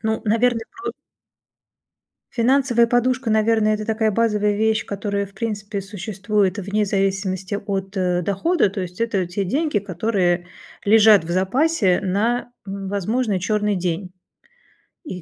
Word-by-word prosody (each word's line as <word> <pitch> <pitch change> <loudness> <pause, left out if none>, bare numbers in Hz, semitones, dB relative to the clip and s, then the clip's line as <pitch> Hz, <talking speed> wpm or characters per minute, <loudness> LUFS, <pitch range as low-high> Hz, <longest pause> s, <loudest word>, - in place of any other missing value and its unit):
Ну, 220 0 -1
наверное, 230 +1 +1
про 385 +1 -6 1.4
Финансовая 240 -1 +3
подушка, 245 0 +1
наверное, 215 0 +3
это 215 0 -4
такая 220 -1 +1
базовая 210 -1 +1
вещь, 220 +1 +1
которая, 200 0 -2
в 200 - -19
принципе, 205 -1 -4
существует 205 0 -1
вне 205 +2 0
зависимости 195 0 -1
от, 195 -1 -4
э, 180 -1 +1
дохода. 205 - +1
То 195 0 -4
есть 180 +2 -8
это 205 -6 0
те 190 +3 -3
деньги, 295 - 0
которые 180 -2 0 0.4
лежат 210 -3 +6
в 170 - -7
запасе 195 - +2
на, 225 +6 0 0.2
м, 195 0 -5
возможный 205 +1 -1
черный 210 +1 0
день 180 +1 -2 0.9
и 185 - -7
205 Hz, 135 wpm, -21 LUFS, 190-225 Hz, 1.4 s, лежат